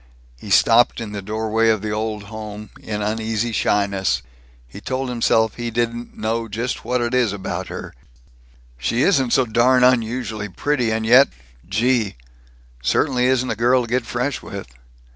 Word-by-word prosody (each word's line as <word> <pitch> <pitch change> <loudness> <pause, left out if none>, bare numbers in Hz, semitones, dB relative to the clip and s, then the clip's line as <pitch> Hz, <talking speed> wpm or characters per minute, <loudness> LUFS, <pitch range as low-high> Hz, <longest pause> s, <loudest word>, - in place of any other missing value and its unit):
He 105 - -10
stopped, 115 +5 +4
in 115 -3 -5
the 105 -1 -5
doorway 110 +2 0
of 110 -2 +1
the 105 - -2
Old 105 0 -3
Home, 105 -1 -8
in 105 -1 -4
uneasy 110 +2 -1
shyness. 100 -3 0 0.4
He 80 +11 -11
told 130 +2 -3
himself 110 -2 +2
he 120 -1 -3
didn't 120 +1 -3
"know 115 +1 -2
just 115 +4 -3
what 125 +2 0
it 120 +1 -1
is 125 -4 +2
about 100 -2 -4
her - - -7 0.9
she 115 - 0
isn't 135 -10 +2
so 130 - +4
darn 125 +3 +3
unusually 115 -3 +1
pretty 125 +3 0
and 110 0 -1
yet 125 +5 +7 0.4
gee 115 +1 +1 0.7
Certainly 125 - +1
isn't 130 -1 +1
a - - -1
girl 125 +3 +3
to - - -6
get 120 0 -1
fresh 125 +3 -2
with. 100 -1 -7
115 Hz, 160 wpm, -21 LUFS, 105-125 Hz, 0.9 s, yet